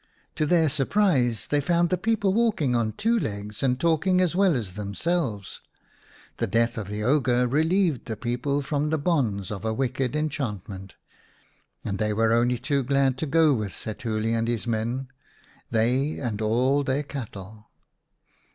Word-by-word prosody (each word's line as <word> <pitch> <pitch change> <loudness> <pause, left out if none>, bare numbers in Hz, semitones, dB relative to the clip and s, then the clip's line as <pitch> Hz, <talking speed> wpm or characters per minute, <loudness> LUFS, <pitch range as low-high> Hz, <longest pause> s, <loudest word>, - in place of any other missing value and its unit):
To 155 - -1
their 165 -1 +4
surprise 140 - +1
they 145 0 +1
found 170 +4 +1
the - - +4
people 205 0 +1
walking 205 - +1
on 115 -2 +1
two 230 - +1
legs 105 - -5
and 125 -1 +1
talking 170 +3 +2
as 180 -2 +1
well 190 -4 +4
as 105 -7 -3
themselves. 105 - -2 0.8
The - - -1
death 115 +1 +1
of 110 -4 -5
the 105 +1 -4
ogre 125 -1 +2
relieved 160 - +1
the 110 -3 -5
people 125 +5 -1
from 150 +1 -1
the 160 - +1
bonds 125 - 0
of 105 -1 -5
a 110 0 -1
wicked 130 +1 -1
enchantment, 105 - -4 0.9
and 100 -2 -3
they 105 0 0
were 115 +1 +2
only 120 +1 +2
too 140 +3 0
glad 135 0 +2
to 160 - -2
go 160 0 +4
with 105 -6 -3
Setuli 110 +1 -3
and 115 0 0
his 120 -1 -1
men, 120 +3 -2 0.6
they 125 +6 +1
and 110 -5 -3
all 125 +6 +2
their 135 +2 0
cattle. 110 -6 -8
125 Hz, 160 wpm, -25 LUFS, 110-150 Hz, 0.9 s, their